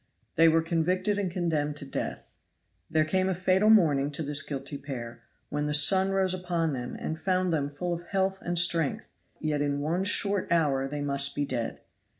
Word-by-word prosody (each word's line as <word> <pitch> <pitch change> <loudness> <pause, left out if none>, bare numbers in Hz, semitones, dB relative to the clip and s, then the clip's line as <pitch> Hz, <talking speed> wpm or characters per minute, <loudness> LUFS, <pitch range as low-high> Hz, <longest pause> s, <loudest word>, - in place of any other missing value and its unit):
They 165 +1 +6
were 165 0 +2
convicted 185 +5 0
and 195 -3 -1
condemned 160 -4 -1
to 145 - -6
death. 135 - -5 0.6
There 155 -1 +2
came 185 +4 +1
a 190 - 0
fatal 185 +3 +2
morning 150 -10 +4
to 160 - -3
this 145 0 +2
guilty 140 0 -6
pair, 120 -5 -7 0.3
when 150 0 -2
the 150 - +3
sun 190 +6 +5
rose 190 -1 +1
upon 175 -4 -1
them 125 -2 -5
and 160 0 -5
found 185 -2 0
them 145 -3 -1
full 175 +5 -3
of 170 0 -7
health 190 0 -1
and 175 0 -3
strength, 170 -3 +2 0.3
yet 150 -2 -1
in 145 -1 -1
one 165 +6 -1
short 200 -1 +1
hour 140 -5 +2
they 145 +1 -5
must 140 0 +2
be 145 - -1
dead. 120 -4 -4
160 Hz, 190 wpm, -28 LUFS, 145-185 Hz, 0.6 s, They